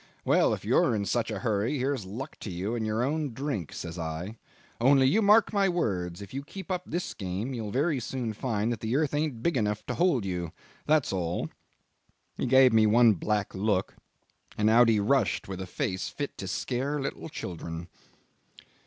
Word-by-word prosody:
'Well, - - +4
if - - -3
you're - - +3
in 100 -1 -1
such 120 +2 0
a 110 - -3
hurry, 110 +4 0
here's 130 -4 -1
luck 115 +8 -6
to - - -6
you 95 +5 -3
in 115 -2 -1
your 110 +2 0
own 145 -1 -1
drink,' 135 - -3
says 85 0 -6
I; 80 +6 -4 0.4
'only, 135 +2 +5
you 200 +12 +4
mark 215 +1 +5
my 200 -2 +3
words, 95 - -2
if 100 - -12
you 135 - -3
keep 190 +7 -8
up 180 -1 0
this 175 +2 -3
game 100 +7 -4
you'll 110 -4 -4
very 140 +5 +1
soon 120 -2 -3
find 110 0 -1
that 115 - -3
the 110 +3 -2
earth 150 0 +1
ain't 145 -6 -1
big 170 -3 +1
enough 105 -3 -1
to - - -3
hold 170 - +2
you 90 -3 -3 0.3
that's 150 -7 +3
all.' 85 -2 -2 0.9
He - - -2
gave 130 -1 +6
me 110 -1 +5
one 115 +1 +6
black 105 +3 -1
look, 100 -1 0 0.6
and 105 +1 +3
out 120 +1 +6
he 110 -2 +3
rushed 115 +1 +1
with 95 -1 -5
a 95 - -5
face 95 +1 -2
fit 145 -1 -5
to 95 - -4
scare 135 +9 -2
little 140 +3 -4
children." 85 - -6
115 Hz, 195 wpm, -28 LUFS, 100-140 Hz, 0.9 s, gave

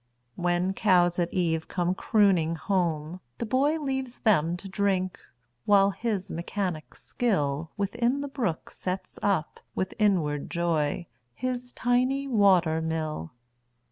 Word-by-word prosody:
When 175 +2 0
cows 180 -3 +3
at 175 -1 0
eve 165 -3 0
come 180 0 0
crooning 185 -6 +2
home, 170 -2 -1 0.2
the - - -3
boyLeaves 265 0 -1
them 175 -6 +3
to 195 - -9
drink, 190 -1 0 0.5
while 200 -1 +5
his 200 -2 -3
mechanic 170 -1 -3
skillWithin 205 - -1
the 285 - -3
brook 235 - -3
sets 185 +1 -5
up, 185 -6 0 0.2
with 190 - -2
inward 165 -9 +1
joy, 170 -1 0 0.3
His 250 0 -3
tiny 255 +3 +1
water 185 -9 +4
mill. 155 - -3
185 Hz, 115 wpm, -27 LUFS, 165-220 Hz, 0.5 s, while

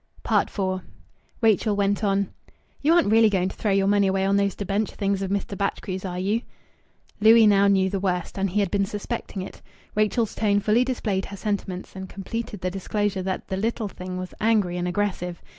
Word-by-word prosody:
IV 185 -2 0 0.6
Rachel 220 -1 +3
went 200 +1 +1
on 200 -1 +1 0.5
"You 310 +3 +4
aren't 340 -12 +3
really 225 0 +6
going 185 -2 +1
to - - -10
throw 215 - -2
your 195 0 +3
money 200 0 +3
away 190 0 +1
on 195 +1 +2
those 200 -1 +1
debenture 200 +1 -2
things 200 -1 0
of 195 - -2
Mr. 200 0 -2
Batchgrew's, 195 -1 -3
are 180 -1 -4
you?" 200 +5 0 0.8
Louis 220 +1 +7
now 200 -1 +5
knew 190 -1 +3
the 195 0 -2
worst, 180 -1 -2
and 195 0 +1
he 205 +4 +1
had 195 - -1
been 200 -1 +2
suspecting 210 -2 -4
it. - - -10 0.3
Rachel's 215 +1 +1
tone 205 -2 +2
fully 215 +4 +3
displayed 220 -7 -1
her 200 - -8
sentiments, 195 -3 -4
and 190 0 -7
completed 215 +1 -5
the 185 - -1
disclosure 200 +1 -1
that 190 0 -4
"the 190 - -2
little 225 +1 -1
thing" 185 -1 -7
was 185 0 -6
angry 210 -5 +2
and 175 0 -1
aggressive. 180 -2 -2
200 Hz, 195 wpm, -24 LUFS, 190-210 Hz, 0.8 s, Louis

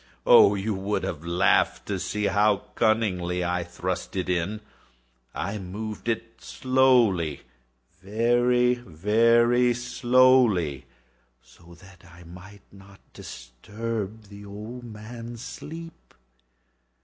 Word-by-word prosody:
Oh, 100 - +7
you 105 +2 -2
would 100 +2 -2
have 80 -1 -4
laughed 85 +1 +1
to - - -3
see 105 0 -3
how 105 0 +2
cunningly 90 -6 0
I 90 0 -1
thrust 90 +2 -5
it 90 -1 -2
in! 90 +4 -1 0.7
I 100 +4 -3
moved 105 +5 -6
it 115 0 -4
slowly—very, 125 - +2 1.3
very 120 +4 +2
slowly, 120 - +2 0.6
so 85 0 -18
that 95 -2 -17
I 90 0 -16
might 90 +4 -13
not 100 0 -16
disturb 105 - -7
the 100 0 -13
old 105 +5 -9
man's 115 +2 -9
sleep. 165 +1 -10
105 Hz, 100 wpm, -25 LUFS, 90-115 Hz, 1.3 s, Oh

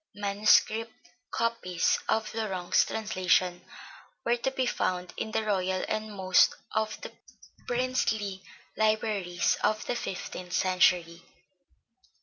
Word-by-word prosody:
Manuscript 215 +2 +2 0.2
copies 230 -7 0
of 220 -1 0
Laurent's 195 -6 +1
translation 185 -4 0 0.6
were 235 - +3
to 240 - -1
be 265 -1 -1
found 180 -6 -1
in - - -3
the 220 - 0
royal 190 -3 0
and 215 0 -3
most 190 -2 +4 0.2
of 220 0 -1
the - - -7 0.6
princely 225 -6 -1 0.3
libraries 215 -5 +1
of 215 0 +1
the 245 - -1
fifteenth 185 -4 -5
century. 180 -2 +2
205 Hz, 110 wpm, -28 LUFS, 185-220 Hz, 0.6 s, most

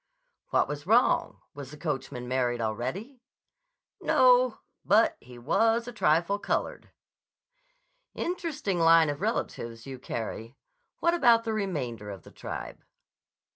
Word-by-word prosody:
"What - - +2
was 145 +2 -6
wrong? 235 +4 +2
Was 140 -2 -9
the 150 - -11
coachman 135 -5 -4
married 125 -1 0
already?" 130 - -4 0.8
"No. 250 -2 +4 0.3
But 215 +3 +4
he 125 0 -13
was 225 - +1
a - - -5
trifle 175 0 +2
colored." - - -3 1.3
"Interesting 310 - -2
line 165 -2 +5
of 145 - -7
relatives 115 - -3
you 130 -2 -8
carry. 115 +2 -6 0.4
What 340 - +3
about 240 -9 +4
the 225 -1 -2
remainder 135 - -3
of 95 -3 -8
the - - -15
tribe?" - - -7
165 Hz, 125 wpm, -28 LUFS, -, 1.3 s, line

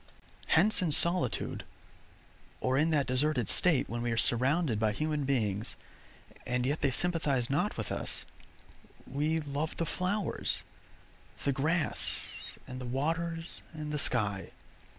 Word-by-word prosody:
Hence 205 +6 +4
in 170 -4 +1
solitude, 170 -4 +3 1.0
or 130 0 0
in 155 +4 +3
that 150 -4 +2
deserted 130 -1 +2
state 165 -8 +4
when 120 +1 -4
we 120 0 -1
are 115 - -1
surrounded 125 +3 +2
by 110 -1 +1
human 150 +2 -1
beings, 110 -6 0 0.7
and 125 0 -1
yet 145 +4 -1
they 140 - +3
sympathize 140 -5 +1
not 140 - 0
with - - -4
us, - - -2 0.8
we 155 +4 0
love 145 +2 -3
the 165 - 0
flowers, 190 +5 -1 0.8
the 140 - +2
grass, 155 +5 -2
and 130 0 -7
the - - -5
waters, 165 +5 -2
and 155 -1 -5
the 150 - -1
sky. 100 -9 +1
145 Hz, 135 wpm, -31 LUFS, 125-160 Hz, 1.0 s, Hence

